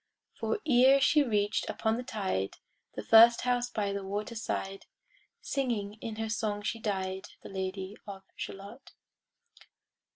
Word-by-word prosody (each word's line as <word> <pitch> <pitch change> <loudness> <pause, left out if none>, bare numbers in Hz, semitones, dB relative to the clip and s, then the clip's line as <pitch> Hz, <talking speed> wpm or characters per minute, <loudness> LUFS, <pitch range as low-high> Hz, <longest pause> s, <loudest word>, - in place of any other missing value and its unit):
For - - -2
ere 265 0 +6
she 300 +2 +4
reached 210 -5 0
upon 220 0 0
the 240 - -3
tide 190 - -2 0.4
The - - -5
first 230 +1 +7
house 245 -1 0
by 205 -4 -2
the 200 0 -4
water 205 +4 -4
side, 195 -3 -4 0.5
Singing 220 -6 -2
in 225 -1 -5
her 220 0 -3
song 215 -1 -2
she 225 +2 -2
died, 190 -2 -3 0.2
The - - -9
Lady 190 +1 -4
of 195 -1 -8
Shalott. 200 +7 -9
215 Hz, 140 wpm, -30 LUFS, 195-235 Hz, 0.5 s, first